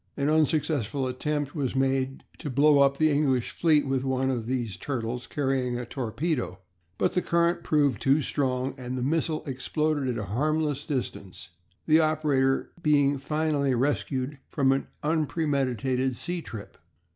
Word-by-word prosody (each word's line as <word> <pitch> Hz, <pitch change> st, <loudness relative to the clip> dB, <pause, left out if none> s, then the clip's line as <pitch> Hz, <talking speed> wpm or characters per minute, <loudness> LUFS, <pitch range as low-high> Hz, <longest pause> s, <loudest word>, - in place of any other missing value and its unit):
An 145 Hz, +1 st, +1 dB
unsuccessful 150 Hz, -5 st, +1 dB
attempt 145 Hz, +3 st, -2 dB
was 135 Hz, -5 st, -2 dB
made 135 Hz, 0 st, 0 dB, 0.2 s
to 150 Hz, -, -5 dB
blow 145 Hz, +2 st, +4 dB
up 140 Hz, 0 st, +4 dB
the 155 Hz, -1 st, +3 dB
English 135 Hz, -4 st, +1 dB
fleet 155 Hz, -4 st, +3 dB
with 135 Hz, -1 st, 0 dB
one 130 Hz, 0 st, 0 dB
of 115 Hz, -3 st, -3 dB
these 120 Hz, -6 st, -2 dB
"Turtles" 120 Hz, -1 st, -4 dB
carrying 135 Hz, -4 st, -1 dB
a 125 Hz, -, -4 dB
torpedo, 125 Hz, -, -2 dB, 0.4 s
but -, -, +1 dB
the 180 Hz, -, +2 dB
current 170 Hz, 0 st, +1 dB
proved 145 Hz, -7 st, +2 dB
too 135 Hz, +3 st, +4 dB
strong, 130 Hz, -3 st, -1 dB
and 125 Hz, 0 st, -4 dB
the 125 Hz, -, -2 dB
missile 155 Hz, +2 st, 0 dB
exploded 145 Hz, +2 st, -1 dB
at 125 Hz, -2 st, -1 dB
a 110 Hz, -, -3 dB
harmless 150 Hz, +2 st, 0 dB
distance, 115 Hz, -, -4 dB, 0.4 s
the 155 Hz, 0 st, +5 dB
operator 150 Hz, -4 st, +1 dB
being 145 Hz, -2 st, +3 dB
finally 145 Hz, -2 st, 0 dB
rescued 135 Hz, +1 st, -1 dB
from 135 Hz, -2 st, +2 dB
an 135 Hz, -, 0 dB, 0.2 s
unpremeditated 135 Hz, -5 st, 0 dB
sea 175 Hz, +6 st, -4 dB
trip! 110 Hz, -9 st, -9 dB
140 Hz, 150 wpm, -27 LUFS, 130-150 Hz, 0.4 s, the